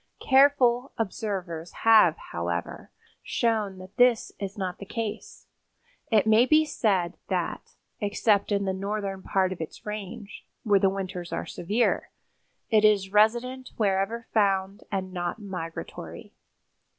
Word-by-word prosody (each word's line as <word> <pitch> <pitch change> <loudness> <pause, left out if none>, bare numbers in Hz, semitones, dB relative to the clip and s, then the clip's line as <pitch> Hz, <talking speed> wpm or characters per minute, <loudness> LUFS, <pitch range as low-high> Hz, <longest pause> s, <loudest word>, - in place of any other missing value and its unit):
Careful 265 -2 +4
observers 185 -6 -4
have, 215 -8 +6
however, 85 +1 -4 0.3
shown 215 -5 -1
that 185 +3 -13
this 245 -2 +4
is 200 +1 -5
not 185 -2 -4
the - - -7
case. 225 -1 -5 0.7
It 215 -2 +4
may 220 +3 +5
be 310 +2 +5
said 190 - 0
that, - - -3 0.2
except 205 0 +1
in 200 -1 +1
the 190 - 0
northern 195 0 -3
part 190 -1 +1
of 175 - -9
its 160 - -8
range, 210 0 -7 0.2
where 205 -3 +4
the 195 - +4
winters 185 -2 -5
are - - -3
severe, 215 +7 0 0.6
it 215 -1 +4
is 200 -2 +3
resident 240 +5 +2
wherever 210 +2 0
found 195 -2 +1
and 190 -2 -3
not 175 +1 -3
migratory. 180 -6 -7
200 Hz, 130 wpm, -26 LUFS, 190-225 Hz, 0.7 s, have